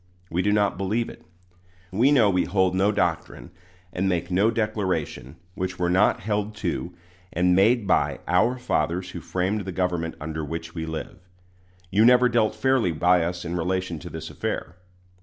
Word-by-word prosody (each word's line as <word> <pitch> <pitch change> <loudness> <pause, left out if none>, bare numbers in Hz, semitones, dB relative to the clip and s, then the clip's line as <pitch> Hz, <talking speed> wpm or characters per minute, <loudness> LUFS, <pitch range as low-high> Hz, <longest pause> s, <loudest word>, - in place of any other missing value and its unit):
We 85 +2 +1
do 105 - +1
not 105 -3 +1
believe 110 +5 -1
it. - - -13 0.7
We 120 +9 +3
know 125 -7 +5
we 90 -2 +2
hold 95 0 +1
no 95 +2 +2
doctrine, 85 - -2 0.4
and 95 +2 0
make 90 0 -1
no 100 +5 +3
declaration, 105 -8 -2 0.2
which 95 0 -4
were 90 -1 0
not 95 +4 +3
held 105 0 -2
to 90 -3 -3 0.4
and 90 +1 +2
made 110 +4 +4
by 95 - +1
"our 110 +9 +2
fathers 90 -5 -1
who 90 - -6
framed 95 +5 -1
the 95 0 -5
government 90 -2 -2
under 80 0 -4
which 80 +2 -6
we 80 -1 -4
live." 80 +4 -6 0.7
You 105 +3 +4
never 125 +1 +6
dealt 110 -3 +1
fairly 125 -4 +2
by 90 +2 +3
us 85 +1 -4
in 85 +1 -3
relation 90 -1 -2
to - - -9
this - - -7
affair. 85 - -4
95 Hz, 175 wpm, -24 LUFS, 85-105 Hz, 0.7 s, never